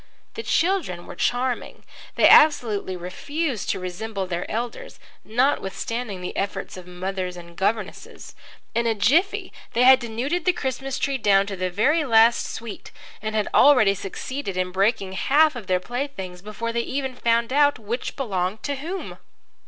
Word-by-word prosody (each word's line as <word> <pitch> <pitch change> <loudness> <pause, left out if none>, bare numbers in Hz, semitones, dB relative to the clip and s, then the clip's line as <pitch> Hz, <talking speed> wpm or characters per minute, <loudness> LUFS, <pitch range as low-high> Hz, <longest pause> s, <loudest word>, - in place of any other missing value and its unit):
The 450 - -5
children 335 - 0
were - - -9
charming. 245 +1 -1 0.3
They - - +6
absolutely 220 -11 +5
refused 255 - -3
to - - 0
resemble 190 +3 -4
their 175 -1 -4
elders, 235 +2 -5 0.2
notwithstanding 230 -3 -1
the 180 - -5
efforts 195 0 -3
of 180 -1 -10
mothers 180 0 -4
and 170 -1 -12
governesses. 200 +2 -3 0.4
In 235 0 +1
a 225 - +1
jiffy 300 - +2 0.2
they 240 +1 +3
had 260 +1 +8
denuded 260 +9 -3
the 365 - +4
Christmas 270 -3 -3
tree 275 -1 -1
down 200 -3 +4
to 200 -1 -5
the 185 0 -2
very 270 - +2
last 230 -3 +4
sweet 225 -2 -7 0.3
and 215 +1 -3
had 210 -1 +1
already 250 -9 +6
succeeded 200 +2 -5
in 185 0 -1
breaking 195 +1 +1
half 295 +9 +3
of 225 -6 -8
their 185 -1 +2
playthings 195 -6 -5
before 220 +3 -5
they 235 - +1
even 265 +1 -3
found 235 0 +1
out 290 0 +4
which 225 +3 -4
belonged 200 -5 -2
to 285 -1 -2
whom. 345 +7 -6
225 Hz, 160 wpm, -23 LUFS, 190-265 Hz, 0.4 s, had